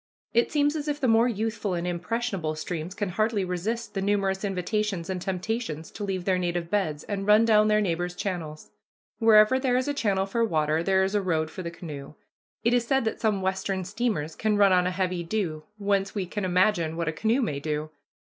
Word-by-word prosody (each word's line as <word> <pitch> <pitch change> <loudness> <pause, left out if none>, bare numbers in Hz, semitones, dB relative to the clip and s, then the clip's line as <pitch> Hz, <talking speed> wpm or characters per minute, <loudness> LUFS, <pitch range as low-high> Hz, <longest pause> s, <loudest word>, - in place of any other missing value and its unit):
It 235 +1 +2
seems 290 0 +2
as 300 -1 -3
if 295 0 -1
the 265 - +1
more 225 +1 +5
youthful 220 -3 -2
and 170 0 -2
impressionable 180 -2 -2
streams 165 +3 -5
can 205 -2 -2
hardly 215 +1 0
resist 210 +6 -3
the 195 - -2
numerous 195 -1 0
invitations 195 -1 -1
and 185 -1 -3
temptations 185 -3 -3
to 210 - -7
leave 190 -3 -3
their 185 -2 +2
native 175 -1 -2
beds 155 -8 0
and 200 -1 -4
run 210 +2 +6
down 215 -1 +5
their 215 0 +3
neighbors' 175 -2 -1
channels. 165 -6 -5 0.5
Wherever 225 +2 +6
there 255 -2 +1
is 255 - 0
a 290 - 0
channel 200 -8 +1
for 230 +4 0
water 155 -6 +1
there 190 +2 +3
is 190 +1 -1
a 205 - +2
road 160 -4 0
for - - -6
the 170 - -4
canoe. 150 -4 -9 0.5
It 235 +1 +3
is 240 -1 +2
said 270 -2 +2
that 220 - -2
some 210 -4 +1
Western 190 0 -1
steamers 190 -7 -2
can 215 -1 +1
run 200 -2 +5
on 180 0 +3
a - - +2
heavy 185 -1 -1
dew, 165 -5 -3
whence 200 -1 0
we 195 -3 -1
can 190 +2 -4
imagine 180 -3 +2
what 170 -1 -2
a 155 - 0
canoe 225 - +1
may 145 -11 -2
do. 150 +1 -3
195 Hz, 215 wpm, -26 LUFS, 175-220 Hz, 0.5 s, run